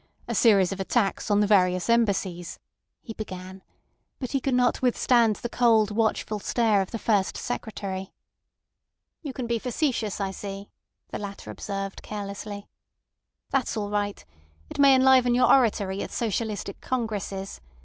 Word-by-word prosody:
A - - -2
series 200 -6 +4
of 195 - -5
attacks 195 +2 0
on 205 0 +4
the - - +4
various 185 -3 +3
Embassies," 200 -7 0 0.5
he 225 - -7
began; 190 -3 -8 0.6
but 255 - -5
he 275 - +1
could 265 0 0
not 250 0 +2
withstand 240 -3 +3
the 240 - -5
cold, 225 -3 +3
watchful 215 -1 0
stare 215 -1 +2
of 190 - -4
the 230 - -4
First 205 -4 +1
Secretary. 195 -5 -5 1.1
"You 295 -5 -5
can 255 -1 -5
be 235 -1 -1
facetious, 245 -5 -1
I 195 -1 -1
see," 195 +1 -7 0.4
the - - -5
latter 200 -1 -7
observed 195 -1 -5
carelessly. 205 0 -6 0.8
"That's 265 -4 0
all 205 -1 -3
right. 205 -1 -2 0.5
It - - -7
may 275 -1 +7
enliven 260 -2 +5
your 250 - +5
oratory 205 -6 +2
at - - -4
socialistic 215 -3 -3
congresses. 205 - -3
210 Hz, 150 wpm, -26 LUFS, 195-240 Hz, 1.1 s, may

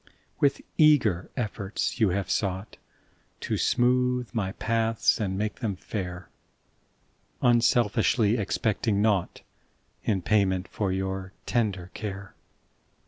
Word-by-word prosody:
% - - -32
W - - +5
ITH 140 - -4 0.2
eager 125 - +4
efforts 105 0 -3
you 110 -4 +4
Have 95 +1 -1
sougkt 95 +1 -2 0.6
To - - -3
smootk 125 0 +1
my 100 -5 -1
paths 115 0 +1
and 95 -2 -1
make 105 +1 -2
them 110 -6 -2
fair, 90 -2 -6 1.2
Unselfiskly 120 -1 +3
expect 105 +3 -1
5 105 - +3
mg - - 0
naugkt 105 -5 +1 0.6
In 95 -4 0
payment 95 -2 +2
for 100 -3 -2
your 95 0 -3
tender 100 -6 -1
care. 100 -2 -6
105 Hz, 125 wpm, -27 LUFS, 95-115 Hz, 1.2 s, W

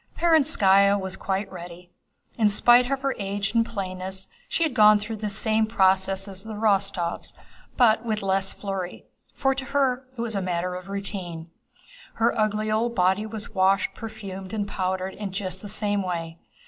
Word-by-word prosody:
Perónskaya 205 - +4
was 190 0 -4
quite 195 +1 -3
ready. 175 -1 -10 0.4
In 220 -3 +3
spite 240 +4 +5
of 275 -1 -2
her 275 -1 +1
age 200 +1 -2
and 230 -1 +4
plainness 190 -3 -5 0.2
she 335 - 0
had 315 -5 0
gone 215 -3 +7
through 215 +2 -5
the 210 0 -3
same 220 +2 +1
process 190 -2 +2
as 190 -1 -7
the 220 +1 -7
Rostóvs, 200 -5 0 0.4
but 225 -2 +4
with 215 -3 -2
less 195 0 +1
flurry—for 195 +7 -4
to 265 0 -5
her 260 -2 0
it - - -3
was 235 -1 -1
a 195 - 0
matter 180 0 -2
of 180 +1 -8
routine. 180 -5 -5 0.6
Her 230 +1 +2
ugly 215 -1 0
old 235 +2 0
body 190 +3 +2
was 220 0 -7
washed, 190 0 +2
perfumed, 195 -3 -8
and 205 -2 -2
powdered 185 0 -2
in 205 -2 -6
just 185 -2 -4
the 205 - -7
same 205 0 -1
way. 170 -3 -4
200 Hz, 170 wpm, -25 LUFS, 190-220 Hz, 0.6 s, gone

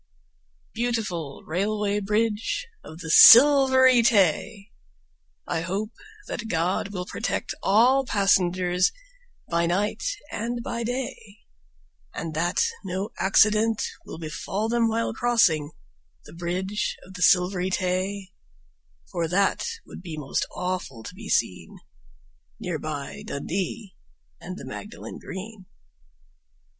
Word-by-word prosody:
Beautiful 210 - -3
Railway 205 +4 -1
Bridge 215 - -1 0.2
of 160 +2 -11
the 160 -2 -4
Silvery 260 - +8
Tay! 205 -2 +2 0.8
I 165 - -1
hope 195 +6 -3 0.3
that 230 - -5
God 180 0 0
will 185 -3 -5
protect - - -3
all 245 +7 +4
passengers 185 -4 +2 0.6
By 170 0 +1
night 200 +5 -1 0.3
and 235 +2 -3
by 235 -1 -4
day, 235 -4 -5 0.8
And 165 -1 -5
that 170 +3 +1 0.2
no 190 +2 -4
accident 215 +3 +3 0.2
will - - -9
befall 170 +7 -4
them 235 0 +2
while 225 0 -1
crossing 220 -12 +2 0.6
The - - -13
Bridge 180 +4 -3
of 190 - -14
the 180 - -8
Silvery 180 +1 +3
Tay, 185 +1 -2 0.8
For 170 -1 -1
that 195 - +1 0.2
would - - -11
be 165 -4 -7
most 140 -3 -2
awful 180 -10 -4
to 180 - -8
be 210 +3 -10
seen 90 -7 -1 0.8
Near 170 -4 -3
by 145 -2 -6
Dundee 190 +7 -4 0.4
and 185 +1 -8
the - - -9
Magdalen 210 +3 -8
Green. 190 0 -9
195 Hz, 115 wpm, -25 LUFS, 175-220 Hz, 0.8 s, Silvery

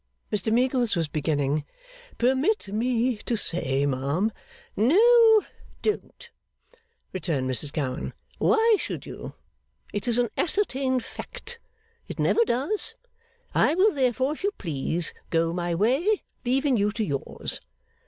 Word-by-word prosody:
Mr 210 +1 +1
Meagles 245 -1 +2
was 165 -2 0
beginning, 145 -1 0 0.5
'Permit 265 - +1
me 235 +3 0
to 235 - -2
say, 140 -8 -1
ma'am 140 +10 0 0.2
' - - -26
'No, 445 - +6 0.4
don't,' 425 - -3 0.8
returned 160 -8 -1
Mrs 130 +3 +1
Gowan. 140 -4 -3 0.3
'Why 445 0 +4
should - - -5
you! - - -8 0.6
It 205 +3 -3
is 235 -1 +2
an 245 -2 +2
ascertained 265 - +1
fact. 475 -1 -8 0.5
It - - -7
never 465 - +3
does. 290 - -1 0.6
I 310 - +3
will 400 +3 +4
therefore, 260 0 +1
if 310 - -10
you 405 - +3
please, 165 0 -2 0.2
go 165 0 +1
my 175 -1 -1
way, 275 - +2 0.2
leaving 265 +1 +2
you 205 0 +2
to 225 - -1
yours. 140 -8 -4
235 Hz, 130 wpm, -26 LUFS, -, 0.8 s, No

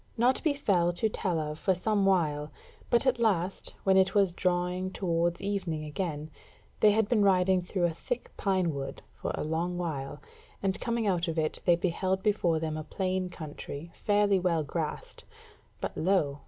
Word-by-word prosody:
Naught 245 +3 +3
befell 200 - +2
to 220 +6 0
tell 185 -5 -1
of 155 0 -3
for 190 -2 +2
some 200 +1 +1
while; 155 -5 +1 0.4
but 240 +2 +4
at 255 -2 +2
last, 195 -5 0
when 190 -1 +4
it 190 +1 +3
was 195 -4 +4
drawing 180 +1 0
towards 175 -2 0
evening 185 -6 -2
again, 155 -1 -4 0.5
they 215 - +6
had 215 0 +3
been 225 -2 +2
riding 190 -1 +4
through 180 +1 -2
a 175 - +3
thick - - -4
pine 185 -5 +1
wood 135 -1 -6
for - - -4
a - - -3
long 165 +3 -1
while, 150 -6 -4 0.4
and 190 -1 0
coming 235 -2 -1
out 180 -3 +1
of 165 0 -3
it 155 -1 -1
they 175 - +6
beheld 185 +2 -1
before 180 -6 +2
them 155 -1 -2
a 155 - -4
plain 185 +3 -2
country 155 -1 -8
fairly 205 -2 +2
well 170 -3 +1
grassed, 155 +2 -4 0.6
but - - -4
lo! 160 -6 +1
180 Hz, 175 wpm, -29 LUFS, 165-195 Hz, 0.6 s, they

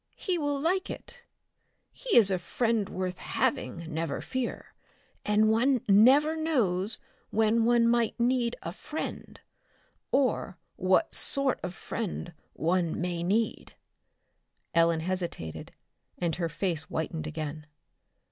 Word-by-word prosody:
He 360 -3 -1
will 290 -2 0
like 365 +6 0
it. - - -9 0.7
He - - 0
is 205 -4 +7
a 185 - +1
friend 225 +3 0
worth 185 -1 -3
having, 170 -1 -1
never 165 +1 -2
fear, 260 -2 -4 0.5
and 215 +1 +3
one 245 +3 +3
never 260 +10 +6
knows 225 - +1 0.3
when 225 +1 +2
one 235 0 +4
may 235 -1 +2
need 245 0 +1
a 165 - -4
friend 300 - -6 0.7
or 255 -8 +1 0.2
what 185 - +2
sort 275 -1 +1
of 180 +1 -5
friend 180 -5 -4 0.2
one 170 0 0
may 175 0 -2
need." 210 +6 -1 1.0
Ellen 165 -1 +3
hesitated, 175 - -4 0.5
and 170 -2 -1
her 170 -2 -1
face 165 -1 -1
whitened 160 -1 -3
again. 155 -1 -5
210 Hz, 120 wpm, -29 LUFS, 175-245 Hz, 1.0 s, is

